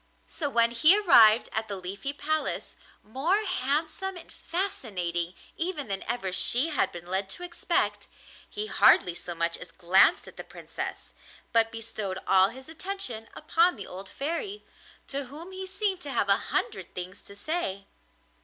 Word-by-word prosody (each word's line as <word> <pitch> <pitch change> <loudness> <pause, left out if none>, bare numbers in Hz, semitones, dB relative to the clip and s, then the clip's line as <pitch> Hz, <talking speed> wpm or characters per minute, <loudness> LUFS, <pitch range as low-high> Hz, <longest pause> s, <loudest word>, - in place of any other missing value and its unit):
So 295 -4 -3
when 235 -3 +3
he 305 - +7
arrived 230 - +7
at 220 0 -2
the 200 - -4
Leafy 195 +8 -5
Palace, 310 +2 -2 0.3
more 320 - 0
handsome 330 +3 -1
and 345 - -11
fascinating 185 - -2 0.2
even 330 - -3
than 195 -1 -2
ever 235 -6 -2
she 250 - +3
had 305 - +1
been 175 0 -9
led 190 +2 -2
to 355 - -3
expect, 355 -1 0 0.4
he 420 +1 -4
hardly 180 - +5
so 175 0 -7
much 170 0 0
as - - -10
glanced 190 - +4
at - - -13
the - - -6
Princess, - - -7 0.4
but 225 -1 +4
bestowed 220 -4 -4
all 190 0 +5
his 260 +3 -12
attention 320 - -4
upon 335 +3 +2
the 200 - -7
old 190 +1 -9
Fairy, 340 +8 -4 0.4
to 280 0 -4
whom 310 +8 -9
he 380 0 -6
seemed 390 -1 -2
to 290 - -6
have 200 - 0
a 195 - +6
hundred 185 -3 -2
things 185 +2 -6
to 200 - -14
say. 200 - -3
245 Hz, 165 wpm, -28 LUFS, -, 0.4 s, he